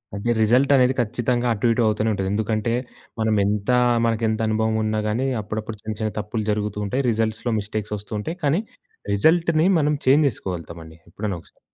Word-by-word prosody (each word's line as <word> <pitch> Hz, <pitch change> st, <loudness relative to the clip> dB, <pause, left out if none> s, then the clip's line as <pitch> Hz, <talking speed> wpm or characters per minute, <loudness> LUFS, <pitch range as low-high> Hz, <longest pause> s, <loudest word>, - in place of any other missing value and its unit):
అంటే 100 Hz, +4 st, -1 dB
రిజల్టనేది 130 Hz, +3 st, +4 dB
ఖచ్చితంగా 120 Hz, +1 st, 0 dB
అటు 110 Hz, +2 st, 0 dB
ఇటు 115 Hz, -, +1 dB
అవుతూనే 110 Hz, +1 st, +1 dB
ఉంటది. 95 Hz, -1 st, -2 dB
ఎందుకంటే, 110 Hz, +2 st, 0 dB, 0.5 s
మనం 110 Hz, -1 st, +2 dB
ఎంతా 105 Hz, +4 st, +1 dB, 0.3 s
మనకెంత 110 Hz, -1 st, 0 dB
అనుభవం 110 Hz, 0 st, +1 dB
ఉన్న 110 Hz, 0 st, -1 dB
గానీ 120 Hz, +5 st, 0 dB
అప్పుడప్పుడు 110 Hz, +1 st, -5 dB
చిన్న 110 Hz, 0 st, -5 dB
చిన్న 110 Hz, 0 st, -1 dB
తప్పులు 105 Hz, +1 st, -3 dB
జరుగుతూంటాయి. 105 Hz, +4 st, -2 dB
రిజల్ట్స్‌లో 110 Hz, +1 st, -1 dB
మిస్టేక్స్ 105 Hz, 0 st, -4 dB
ఒస్తూంటాయి. 105 Hz, -, -5 dB
కానీ 150 Hz, +7 st, +2 dB, 0.5 s
రిజల్ట్‌ని 160 Hz, -, +3 dB
మనం 150 Hz, 0 st, +2 dB
చేంజ్ 145 Hz, +3 st, +5 dB
చేసుకోగలుతామండి 85 Hz, -, -7 dB
ఎప్పుడైనా 100 Hz, +1 st, -4 dB
ఒకసారి. -, -, -24 dB
110 Hz, 150 wpm, -23 LUFS, 105-125 Hz, 0.5 s, చేంజ్